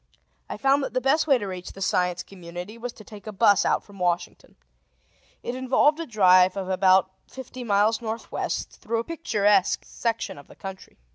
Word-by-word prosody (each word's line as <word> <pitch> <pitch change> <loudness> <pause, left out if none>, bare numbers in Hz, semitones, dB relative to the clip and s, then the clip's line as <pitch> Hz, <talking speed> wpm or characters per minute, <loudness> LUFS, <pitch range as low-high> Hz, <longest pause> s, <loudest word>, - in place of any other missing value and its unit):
I - - -5
found 275 +1 +3
that 270 - -5
the - - +3
best 285 +5 +2
way 275 -3 +5
to 215 - -5
reach 185 -2 -7
the - - -12
Science 180 -1 0
Community 180 +2 -9
was 240 +1 -6
to 215 - -14
take 210 0 -13
a - - -4
bus 205 0 +4
out - - +1
from 200 -2 -16
Washington. 175 -1 -2 0.9
It 240 - -3
involved 260 +4 +2
a 330 - -4
drive 185 -4 +5
of 190 -1 -4
about 190 0 +3 0.2
fifty 255 -1 -9
miles 215 +1 +2
northwest, 225 0 -4
through 230 +1 -2
a - - -7
picturesque 210 - +1
section 230 -10 -3
of 145 - -15
the - - -16
country. 190 -1 -10
210 Hz, 190 wpm, -25 LUFS, 185-245 Hz, 0.9 s, way